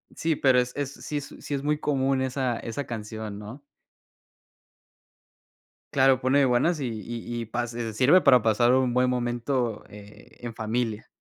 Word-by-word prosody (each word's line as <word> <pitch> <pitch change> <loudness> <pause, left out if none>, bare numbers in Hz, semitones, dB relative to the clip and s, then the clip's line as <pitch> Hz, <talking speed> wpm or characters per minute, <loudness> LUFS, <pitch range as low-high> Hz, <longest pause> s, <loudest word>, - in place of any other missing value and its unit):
Sí, 160 -1 0
pero 130 -3 +4
es 125 0 -1
es, 145 -1 -3
sí 150 - -5
es 145 - -7
sí 145 - -6
es 140 -1 -2
muy 150 0 0
común 135 -2 0
esa 130 -2 -1
esa 120 +4 -5
canción, 110 -2 -6
¿no? 115 +7 -10 2.3
Claro, 135 -2 +4
pone 135 +2 +3
buenas, 130 +7 +2
y 135 - -2
y 115 +2 -5
y 115 - -5
pa 120 +2 -3
se 115 -1 -5
sirve 135 - +5
para 130 -6 +5
pasar 120 +3 +3
un 130 -2 +2
buen 125 0 +3
momento, 120 -1 -1
eh, 105 0 -14
en 120 -2 -6
familia. 110 -1 -2
125 Hz, 165 wpm, -26 LUFS, 115-135 Hz, 2.3 s, sirve